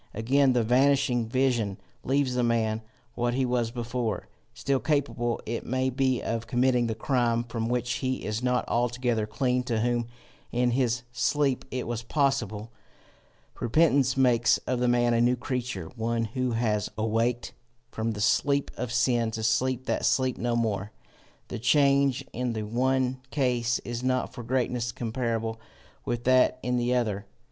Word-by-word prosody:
Again, 130 +5 +3
the 120 -2 +2
vanishing 125 -1 +2
vision 120 -5 0 0.3
leaves 135 -1 +1
the 125 - +1
man 115 -2 +1 0.3
what 120 +1 -1
he 130 0 +1
was 120 -2 0
before, 120 -2 -3 0.2
still 135 -1 -1
capable 135 -6 0
it 115 +1 -3
may 130 +1 0
be 130 -1 0
of 115 0 -3
committing 125 -1 +2
the 110 - -2
crime 120 -1 +1
from 115 -1 -3
which 120 0 -1
he 130 -1 -2
is 110 +2 -2
not 125 0 0
altogether 120 -2 0
clean 125 +3 0
to 115 -3 0
whom 120 0 0 0.4
in 120 0 +1
his 125 -1 0
sleep 135 +2 0
it 130 -1 -3
was 120 0 -3
possible: 120 -5 -1 0.9
repentance 135 0 +3
makes 120 -3 +4
of 130 -1 -1
the 125 - +1
man 120 0 +3
a 115 - +3
new 120 +1 +3
creature, 125 - -4
one 115 0 -1
who 125 +2 -2
has 110 -3 0
awaked 115 +2 0 0.4
from 110 +1 -2
the 105 - -5
sleep 140 +6 +2
of 125 -2 -3
sin 120 -1 +2
to 110 0 -5
sleep 125 +3 +1
that - - -1
sleep 130 -2 +2
no 120 0 -1
more. 105 -3 -1 0.6
The - - -5
change 140 +1 +3
in 125 0 -2
the 110 -1 -3
one 130 +3 0
case 125 -4 +1
is 120 0 -4
not 130 0 0
for 125 - -7
greatness 120 0 -1
comparable 115 -2 -3 0.4
with 120 0 -2
that 130 0 +4
in 125 0 0
the 120 +1 +1
other. 105 -5 -1
120 Hz, 160 wpm, -27 LUFS, 115-130 Hz, 0.9 s, makes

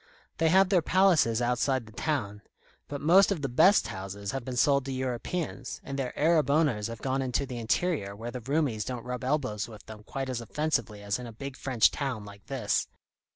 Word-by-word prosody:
They 165 0 +4
have 190 +2 +5
their 185 -3 +4
palaces 160 -11 +3
outside 125 +1 +1
the 110 - -14
town; 110 -5 -2 0.5
but 145 -1 -5
most 185 +7 +6
of 165 -7 -2
the - - +1
best 185 +11 +5
houses 100 +1 -5
have 135 -1 -4
been 125 +1 -5
sold 140 +1 +4
to 135 - -4
Europeans, 130 +2 -3
and 140 0 -5
their 130 -2 -3
Arab 155 -1 +3
owners 140 -9 +2
have 115 -2 -8
gone 135 0 0
into 130 +1 -1
the 125 -3 -6
interior 115 - 0
where 115 +3 -6
the 125 - -6
Roumis 135 -4 0
don't 125 -1 -5
rub 125 0 -4
elbows 130 -6 -1
with 110 -3 -12
them 110 -1 -10
quite 135 +5 -5
as 125 -2 -3
offensively 115 -5 -2
as 100 +3 -1
in 125 - -7
a - - -8
big 135 +4 -7
French 130 -5 +3
town 130 -7 -3
like 100 -2 -13
this. - - 0
130 Hz, 205 wpm, -28 LUFS, 115-145 Hz, 0.5 s, most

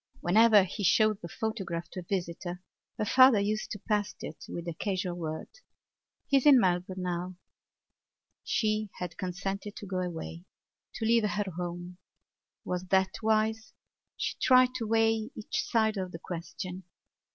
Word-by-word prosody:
Whenever 215 +3 +6
he 190 +3 -5
showed 215 +2 +3
the 170 - -6
photograph 185 -5 -4
to - - -6
a - - -7
visitor 175 -1 -3 0.4
her 215 - -1
father 255 0 +7
used 215 +2 -1
to - - -4
pass 205 0 -1
it - - -8
with 170 0 -6
a 170 - -2
casual 185 0 -2
word: 160 -2 -5 0.8
"He 275 - +3
is 270 - +2
in 275 -3 +9
Melbourne 185 -1 0
now." 180 +1 -3 1.1
She 215 -1 0
had 180 -2 -5
consented 195 +3 -4
to - - -8
go 185 -1 -2
away, 170 -1 -5 0.5
to 225 - -3
leave 225 -2 +3
her 205 -2 -2
home. 175 +1 -6 0.7
Was 180 0 -3
that 190 0 +3
wise? 220 0 +1 0.4
She - - -2
tried 255 0 +5
to 225 -3 -3
weigh 225 0 +2
each 215 - -2
side 220 -2 +1
of 185 -1 -4
the - - -4
question. 180 +2 -6
195 Hz, 155 wpm, -29 LUFS, 180-220 Hz, 1.1 s, in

